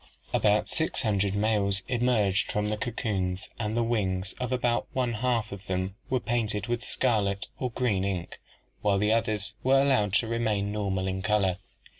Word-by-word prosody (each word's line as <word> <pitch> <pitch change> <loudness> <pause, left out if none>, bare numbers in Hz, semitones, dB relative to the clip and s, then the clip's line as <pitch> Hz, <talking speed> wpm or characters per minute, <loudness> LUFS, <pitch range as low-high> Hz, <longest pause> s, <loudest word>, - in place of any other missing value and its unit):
"About - - +3
six - - -1
hun 105 -3 +1
dred 100 0 +1
males 100 -2 +2
emerged 115 -6 +1
from 105 0 0
the 105 - 0
cocoons 100 -6 -2
and 110 0 -1
the 120 - +3
wings 95 -5 0
of 125 0 -2
about 120 -2 +1
one 125 -2 0
half 115 -1 0
of 100 -1 -9
them 95 +1 -1 0.2
were 130 - +2
painted 110 -4 0
with 120 +1 -2
scarlet 105 -5 +1
or 125 - -1
green 115 -6 0
ink, 95 -3 -3 0.4
while 100 -1 +2
the 105 +2 +2
others 110 -2 0
were 135 +1 +4
allowed 130 -8 +3
to 110 +2 +2
remain 110 -3 0
normal 100 -3 -1
in 95 0 -2
color. 95 -2 +1
105 Hz, 175 wpm, -28 LUFS, 100-120 Hz, 0.4 s, were